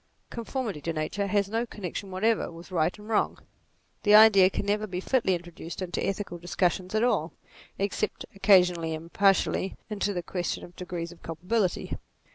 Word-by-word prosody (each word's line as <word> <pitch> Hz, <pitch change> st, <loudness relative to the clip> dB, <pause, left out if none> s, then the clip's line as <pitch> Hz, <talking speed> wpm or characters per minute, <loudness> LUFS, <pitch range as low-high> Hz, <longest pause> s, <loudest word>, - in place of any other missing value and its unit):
Conformity 235 Hz, -, -4 dB
to 165 Hz, +3 st, -2 dB
nature, 160 Hz, +6 st, -2 dB
has 200 Hz, 0 st, +1 dB
no 225 Hz, +3 st, -1 dB
connection 195 Hz, -1 st, -6 dB
whatever 210 Hz, +3 st, +1 dB
with 170 Hz, +2 st, -12 dB
right 165 Hz, +1 st, +1 dB
and 210 Hz, 0 st, -12 dB
wrong. 220 Hz, -2 st, +1 dB, 0.6 s
The 210 Hz, 0 st, +6 dB
idea 210 Hz, -4 st, +8 dB
can 200 Hz, -, -3 dB
never 210 Hz, +1 st, 0 dB
be 180 Hz, -2 st, -4 dB
fitly 190 Hz, -2 st, +1 dB
introduced 175 Hz, -1 st, -8 dB
into 185 Hz, -2 st, -3 dB
ethical 195 Hz, -3 st, -3 dB
discussions 180 Hz, +2 st, -1 dB
at 215 Hz, -, +2 dB
all, 165 Hz, -10 st, +1 dB, 0.4 s
except, 200 Hz, +1 st, -2 dB
oc 195 Hz, -, -16 dB
casionally 180 Hz, -5 st, +4 dB
and 165 Hz, +2 st, -10 dB
partially, 195 Hz, -1 st, +2 dB
into 205 Hz, -1 st, -1 dB
the 175 Hz, -3 st, -3 dB
question 175 Hz, 0 st, -3 dB
of 175 Hz, -, -12 dB
degrees 175 Hz, -2 st, -5 dB
of 175 Hz, -, -15 dB
culpability. 180 Hz, +4 st, -1 dB
190 Hz, 170 wpm, -27 LUFS, 175-210 Hz, 0.6 s, idea